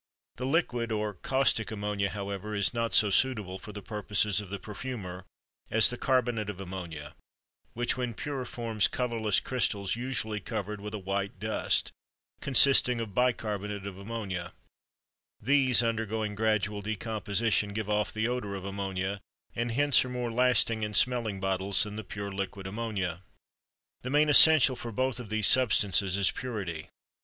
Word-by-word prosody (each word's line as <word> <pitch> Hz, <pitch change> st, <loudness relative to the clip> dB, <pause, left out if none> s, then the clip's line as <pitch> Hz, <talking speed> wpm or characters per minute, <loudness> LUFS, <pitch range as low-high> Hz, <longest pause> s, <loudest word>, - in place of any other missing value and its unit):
The 130 Hz, +2 st, -3 dB
liquid 125 Hz, -6 st, 0 dB
or 105 Hz, -1 st, -2 dB
caustic 130 Hz, +2 st, +1 dB
ammonia, 105 Hz, -2 st, -2 dB
however, 100 Hz, +1 st, -5 dB
is 100 Hz, +2 st, +2 dB
not 115 Hz, -1 st, -1 dB
so 105 Hz, -2 st, +4 dB
suitable 105 Hz, -5 st, 0 dB
for 105 Hz, -, -10 dB
the 105 Hz, -1 st, -9 dB
purposes 105 Hz, -1 st, 0 dB
of 100 Hz, -, -10 dB
the 100 Hz, -, -4 dB
perfumer 100 Hz, -4 st, -7 dB, 0.4 s
as 110 Hz, +1 st, +5 dB
the -, -, -3 dB
carbonate 120 Hz, -5 st, 0 dB
of 100 Hz, -2 st, -6 dB
ammonia, 85 Hz, -6 st, -7 dB, 0.6 s
which 120 Hz, +2 st, -1 dB
when 125 Hz, -3 st, -3 dB
pure 140 Hz, 0 st, -4 dB
forms 115 Hz, -4 st, +1 dB
colorless 115 Hz, -5 st, 0 dB
crystals 100 Hz, -6 st, -1 dB
usually 120 Hz, -3 st, -3 dB
covered 105 Hz, -1 st, -5 dB
with 105 Hz, +1 st, -6 dB
a -, -, -3 dB
white 100 Hz, 0 st, -3 dB
dust 110 Hz, +2 st, 0 dB, 0.5 s
(consisting 130 Hz, -2 st, +5 dB
of 110 Hz, -3 st, -5 dB
bicarbonate 105 Hz, -5 st, -1 dB
of 100 Hz, -1 st, -7 dB
ammonia); 100 Hz, -5 st, -5 dB, 0.9 s
these, 130 Hz, -1 st, +3 dB
undergoing 110 Hz, -2 st, -2 dB
gradual 105 Hz, -1 st, 0 dB
decomposition, 105 Hz, 0 st, -1 dB
give 105 Hz, 0 st, -4 dB
off 105 Hz, 0 st, 0 dB
the 110 Hz, +1 st, -1 dB
odor 120 Hz, -5 st, -3 dB
of 95 Hz, -1 st, -7 dB
ammonia 95 Hz, 0 st, -3 dB, 0.3 s
and 120 Hz, 0 st, -2 dB
hence 145 Hz, +1 st, +4 dB
are 130 Hz, -, -7 dB
more 125 Hz, -2 st, -3 dB
lasting 120 Hz, -2 st, +2 dB
in 105 Hz, -1 st, -3 dB
smelling 115 Hz, -4 st, +2 dB
bottles 95 Hz, 0 st, +1 dB
than 105 Hz, -1 st, -6 dB
the 110 Hz, -, -5 dB
pure 100 Hz, +1 st, -6 dB
liquid 95 Hz, 0 st, -5 dB
ammonia. 95 Hz, -4 st, -3 dB, 0.8 s
The 125 Hz, -, -5 dB
main 150 Hz, +2 st, +3 dB
essential 150 Hz, -3 st, +8 dB
for 120 Hz, -1 st, -7 dB
both 130 Hz, +1 st, -1 dB
of 120 Hz, -4 st, -8 dB
these 110 Hz, -1 st, 0 dB
substances 100 Hz, -6 st, +4 dB
is 100 Hz, -2 st, +2 dB
purity. 95 Hz, -11 st, -5 dB
105 Hz, 155 wpm, -29 LUFS, 100-120 Hz, 0.9 s, essential